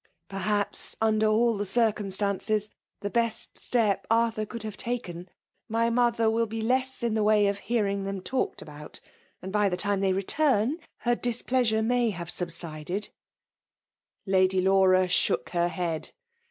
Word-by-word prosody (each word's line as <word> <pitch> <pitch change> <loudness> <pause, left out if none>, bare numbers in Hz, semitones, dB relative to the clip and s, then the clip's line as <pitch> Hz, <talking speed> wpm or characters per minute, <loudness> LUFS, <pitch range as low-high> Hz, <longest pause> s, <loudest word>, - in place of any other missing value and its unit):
— - - -47
'' - - -50
Ferfaaps, 205 +1 -1
under 220 -1 +2
all 225 +2 +3
the 205 - -2
dicnmBtaiicea, 210 -1 0 0.3
tke 205 -1 -3
beat 230 -1 +2 0.2
step 220 -5 0
Arthur 225 -1 +1
could 230 0 -7
hare 215 - -4
taken. 190 -7 -5 0.4
My 230 +1 +1
nother 235 -1 +2
wSi 225 0 +2
be 225 +1 -4
less 260 +2 0
in 235 -2 +1
the 220 - +1
way 210 0 +4
of 200 0 0
hearing 200 -4 -1
then 195 -1 -4
talked 260 +7 -2
about; 150 -1 -10 0.4
and 190 - -5
by 210 0 +2
the 180 - -2
time 200 +1 0
they 195 -1 +2
retim^ 250 - +1 0.2
her 240 - +2
displeasure 240 -2 +1
may 245 0 +2
have 175 -4 -6
subsided/' 170 +2 -4 1.2
Lady 190 -1 +3
Laura 185 -1 +4
shook 125 -8 +1
her 175 -1 +1
head. 170 -2 -3
210 Hz, 155 wpm, -27 LUFS, 190-230 Hz, 1.2 s, way